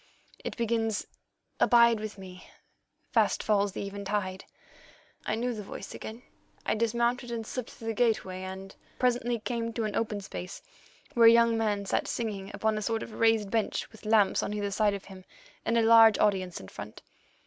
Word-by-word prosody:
It - - -5
begins: 225 -2 0 0.5
'Abide 235 -2 +5
with 215 -1 -6
me, 185 -1 -11 0.6
fast - - +2
falls 205 -2 +2
the 200 - -4
eventide.' 200 -1 -3 0.8
"I 215 - +1
knew 245 +2 -1
the 215 - -6
voice 200 - -8
again. 225 +3 -8 0.4
I - - +1
dismounted 235 +2 0
and 230 -1 -4
slipped 255 +1 -5
through 225 - -7
the - - 0
gateway, 215 -5 0
and 190 +1 -7 0.2
presently 245 -1 +1
came 230 0 -3
to 230 - -2
an 215 -1 -2
open 215 -2 -1
space, 180 -1 -7 0.5
where 230 -1 +7
a - - +10
young 230 0 +5
man 210 -3 0
sat - - 0
singing 205 -4 -3
upon 220 -1 0
a - - -5
sort 225 +1 -1
of 225 - -9
raised 225 -3 +3
bench 225 -2 -1
with 220 -1 -12
lamps 215 -3 +4
on 210 - -3
either 205 -1 -2
side 205 0 +2
of 200 - -8
him, 190 -1 -12 0.4
and 230 - +2
a 230 - +4
large 225 -1 +7
audience 190 -4 +1
in 95 - -11
front. - - -10
220 Hz, 180 wpm, -29 LUFS, 200-230 Hz, 0.8 s, a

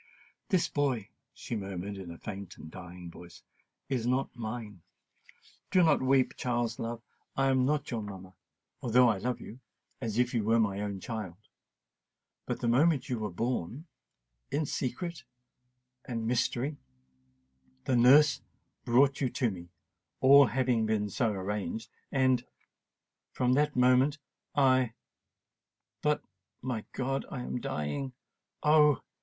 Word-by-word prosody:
"This 185 -5 +2
boy," 130 -8 -1 0.2
she 120 - -6
murmured 100 -1 -4
in 95 -3 -8
a 85 - -8
faint 100 -2 -7
and 80 - -10
dying 90 -1 -9
voice, 85 0 -13 0.4
"is 125 -3 -1
not 130 +2 0
mine. 110 -5 -6 0.9
Do 185 - +4
not 160 -3 +4
weep, 130 0 +3
Charles, 120 -2 -1
love—I 120 +3 -3
am 130 -1 +3
not 150 0 0
your 115 -2 -2
mamma——although 105 +5 -1
I 105 -5 +2
love 125 +3 -2
you——as 115 -1 -9
if 125 +1 +2
you 115 -3 +1
was 115 +2 +3
my 100 -2 +1
own 100 -2 -3
child. 105 -6 -5 1.1
But - - -3
the - - 0
moment 140 +5 +3
you 125 -3 -1
were 105 -1 -2
born——in 115 - -5
secret——and 125 -4 -6
mystery——the 65 - -4
nurse 140 +5 +6 0.4
brought 135 +4 +3
you 130 - +2
to 120 -2 0
me——all 95 - +2
having 120 -3 +1
been 105 -2 0
so 115 +4 +1
arranged——and——from 120 +5 -3
that 145 +2 +2
moment 130 +3 +4 0.4
I——but, 130 +3 -2 0.4
my 120 -4 -3
God! 135 +1 -2
I 135 - -5
am 125 - -4
dying!——oh! 140 - 0
120 Hz, 115 wpm, -30 LUFS, 100-130 Hz, 1.1 s, nurse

